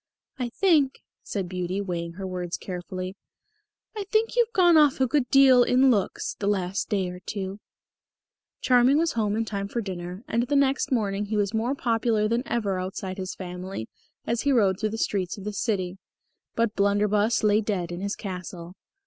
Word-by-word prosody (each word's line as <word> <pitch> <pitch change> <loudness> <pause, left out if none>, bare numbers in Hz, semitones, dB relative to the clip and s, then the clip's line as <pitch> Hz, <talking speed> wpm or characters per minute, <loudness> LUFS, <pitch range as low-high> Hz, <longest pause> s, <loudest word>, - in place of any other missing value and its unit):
"I 245 -1 -1
think," 300 -3 +2 0.2
said 195 -3 -4
Beauty, 180 +1 -3
weighing 170 -4 -3
her 190 +2 -6
words 180 -2 -4
carefully, 185 +1 -6 0.8
"I 415 -2 -4
think 435 +3 +1
you've 475 -2 +3
gone 355 -6 +5
off 295 -4 +5
a 260 - +4
good 260 -1 0
deal 270 -2 +7
in 255 +2 +4
looks 205 -5 -1
the 200 - -2
last 190 -2 -1
day 195 -4 0
or 180 - -9
two." 195 +1 -5 1.0
Charming 250 +2 +4
was 330 0 +2
home 210 -2 0
in 225 +1 0
time 200 -2 -3
for 235 - -3
dinner, 185 -1 -6
and 235 +2 0
the 290 - 0
next 275 0 +2
morning 205 -4 0
he 215 +1 -2
was 205 0 0
more 235 +5 0
popular 225 -4 +1
than 235 +2 +1
ever 200 -5 -1
outside 185 +1 -5
his 185 0 -4
family 180 -8 -6 0.4
as 230 0 0
he 285 - +1
rode 200 -7 +3
through 215 - 0
the 225 - -5
streets 190 -4 -1
of 200 - -9
the 210 +1 -4
city. 190 -4 -2 0.6
But 230 -2 0
Blunderbus 205 +2 +2
lay 210 0 +4
dead 190 -5 -2
in 175 +1 -5
his 200 +1 -2
Castle. 180 -3 -7
205 Hz, 185 wpm, -26 LUFS, 185-240 Hz, 1.0 s, deal